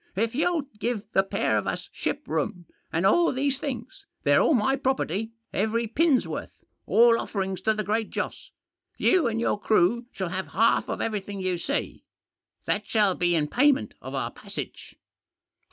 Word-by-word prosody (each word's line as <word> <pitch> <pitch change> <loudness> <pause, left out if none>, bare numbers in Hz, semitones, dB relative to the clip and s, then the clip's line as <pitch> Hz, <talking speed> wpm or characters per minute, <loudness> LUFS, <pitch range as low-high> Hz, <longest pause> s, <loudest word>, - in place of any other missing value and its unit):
" - - -41
If 225 - -8
you'll 315 +3 +1 0.2
give 230 -3 -1
the 195 - +4
pair 195 - 0
of - - -5
us - - -3
ship 290 - -3
room, 160 +3 -2 0.3
and 170 +3 0
all 340 - +4
these 275 +1 0
things 250 -6 -6
— - - -50
they're - - +5
all 310 - +4
my 250 +4 +2
pro 270 -1 +1
perty, 210 +1 -2 0.2
every 220 +3 0
pin's 280 +4 +2
worth, - - -5 0.4
all 230 0 +5
offerings 190 -2 -3
to 220 +2 +2
the 215 - -2
Great 215 +2 -1
Joss - - -4 0.2
— - - -65
you 350 -8 +3
and 225 -1 -1
your 230 - 0
crew 220 +4 +2
shall 190 -3 -4
have 185 +2 -3
half 225 +3 +3
of - - -2
every 215 -3 -1
thing 200 +1 -7
you 185 -2 -1
see. 280 +10 -3 0.6
That 205 0 -1
shall 210 -4 +3
be 175 -1 +1
in 150 -2 +1
payment 285 - +2
of - - -6
our - - -2
passage." - - -8
220 Hz, 190 wpm, -26 LUFS, 190-260 Hz, 0.6 s, they're